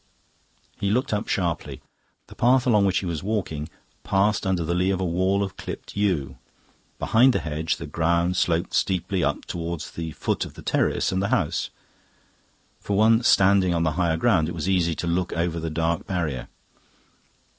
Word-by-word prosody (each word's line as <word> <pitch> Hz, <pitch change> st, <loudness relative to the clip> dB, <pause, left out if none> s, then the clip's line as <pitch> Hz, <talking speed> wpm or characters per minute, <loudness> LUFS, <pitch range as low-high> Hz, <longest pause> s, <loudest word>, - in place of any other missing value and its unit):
He 100 Hz, -, 0 dB
looked 125 Hz, +3 st, 0 dB
up 105 Hz, -, -1 dB
sharply. 85 Hz, -4 st, -2 dB, 0.5 s
The -, -, -14 dB
path 125 Hz, +1 st, +3 dB
along 105 Hz, -5 st, +4 dB
which 95 Hz, -, +1 dB
he -, -, -1 dB
was 85 Hz, -4 st, -3 dB
walking 90 Hz, -8 st, -3 dB, 0.3 s
passed 100 Hz, +1 st, +1 dB
under 90 Hz, -3 st, +1 dB
the 85 Hz, +2 st, -1 dB
lee 90 Hz, +2 st, +1 dB
of 95 Hz, -1 st, 0 dB
a 95 Hz, -, -1 dB
wall 95 Hz, +3 st, +1 dB
of 95 Hz, -1 st, -5 dB
clipped -, -, -8 dB
yew. 75 Hz, -11 st, -1 dB, 0.6 s
Behind 125 Hz, +3 st, +4 dB
the -, -, +1 dB
hedge 80 Hz, +1 st, -2 dB
the -, -, -7 dB
ground 85 Hz, +4 st, +1 dB
sloped 85 Hz, 0 st, 0 dB
steeply 95 Hz, -1 st, 0 dB
up -, -, -1 dB
towards 85 Hz, -2 st, -5 dB
the 80 Hz, -2 st, -5 dB
foot -, -, -1 dB
of -, -, -9 dB
the -, -, -11 dB
terrace -, -, +1 dB
and 95 Hz, 0 st, 0 dB
the 100 Hz, -, 0 dB
house; -, -, 0 dB, 1.1 s
for 100 Hz, -, -2 dB
one 110 Hz, +2 st, +5 dB
standing 95 Hz, -5 st, +4 dB
on 85 Hz, -, +1 dB
the 80 Hz, -, +1 dB
higher 80 Hz, 0 st, 0 dB
ground 80 Hz, -1 st, +2 dB
it 85 Hz, -, -5 dB
was 80 Hz, +2 st, -3 dB
easy 90 Hz, -4 st, +1 dB
to -, -, -4 dB
look 85 Hz, +1 st, -1 dB
over 85 Hz, 0 st, -1 dB
the 80 Hz, 0 st, -3 dB
dark 80 Hz, +1 st, -1 dB
barrier. 80 Hz, -9 st, -2 dB
90 Hz, 185 wpm, -24 LUFS, 80-100 Hz, 1.1 s, one